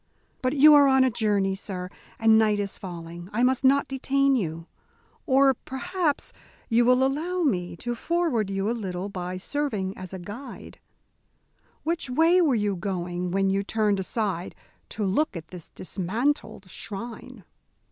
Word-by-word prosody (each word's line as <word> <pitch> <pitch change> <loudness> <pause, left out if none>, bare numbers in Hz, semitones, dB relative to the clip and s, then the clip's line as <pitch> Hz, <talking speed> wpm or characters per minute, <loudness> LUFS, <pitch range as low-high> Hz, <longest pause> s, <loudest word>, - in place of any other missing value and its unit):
But 255 +1 0
you 300 +1 +8
are 285 -1 +7
on 265 -1 +5
a 260 - +2
journey, 205 -4 +1
sir, 190 -2 -5 0.3
and 225 0 +5
night 215 -1 +4
is 200 -1 -3
falling. 175 -1 -8
I 235 +4 0
must 260 +1 +2
not 275 +1 +4
detain 275 +1 +1
you. 165 -7 -3 0.6
Or 270 -1 +5
perhaps 310 +5 -3 0.4
you 235 0 +4
will 250 +1 +4
allow 335 +7 -1
me 180 - 0
to 240 +7 -4
forward 275 - 0
you 195 +1 -1
a - - +1
little 195 -4 -4
by 180 -1 -5
serving 210 -4 -2
as 185 -1 -9
a 190 - -5
guide. 205 +10 -9 1.0
Which 330 -4 -2
way 330 +7 +4
were 295 -7 +3
you 205 -2 0
going 180 -1 -3
when 195 +1 +1
you 195 +1 +1
turned 210 -1 0
aside 190 -2 -2 0.3
to 215 - -3
look 205 - 0
at 160 -1 -10
this 180 -3 -10
dismantled 200 +4 -2
shrine?" 230 +2 -7
220 Hz, 155 wpm, -26 LUFS, 190-270 Hz, 1.0 s, you